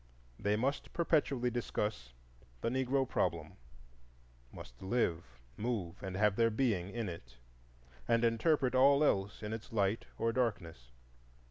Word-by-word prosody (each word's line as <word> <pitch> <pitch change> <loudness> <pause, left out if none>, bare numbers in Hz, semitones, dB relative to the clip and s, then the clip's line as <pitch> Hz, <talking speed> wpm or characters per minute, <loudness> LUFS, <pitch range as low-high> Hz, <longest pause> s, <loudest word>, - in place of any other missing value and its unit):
They 105 +1 +1
must 135 +6 -2
perpetually 140 -7 +1
discuss 105 - -3 0.5
the - - 0
"Negro 130 +1 +1
Problem,"—must - - -7
live, 95 -5 0 0.3
move, 105 -7 -3
and 95 -1 -5
have 105 -1 +3
their 115 -1 +4
being 110 -6 0
in 115 +1 -3
it, 65 -8 -9 0.7
and 115 0 +3
interpret 125 +3 +2
all 140 +3 +5
else 100 -6 0
in 105 +1 -3
its 110 -1 -7
light 105 0 0
or 115 0 0
darkness. 90 - -2
105 Hz, 125 wpm, -34 LUFS, 85-125 Hz, 0.7 s, all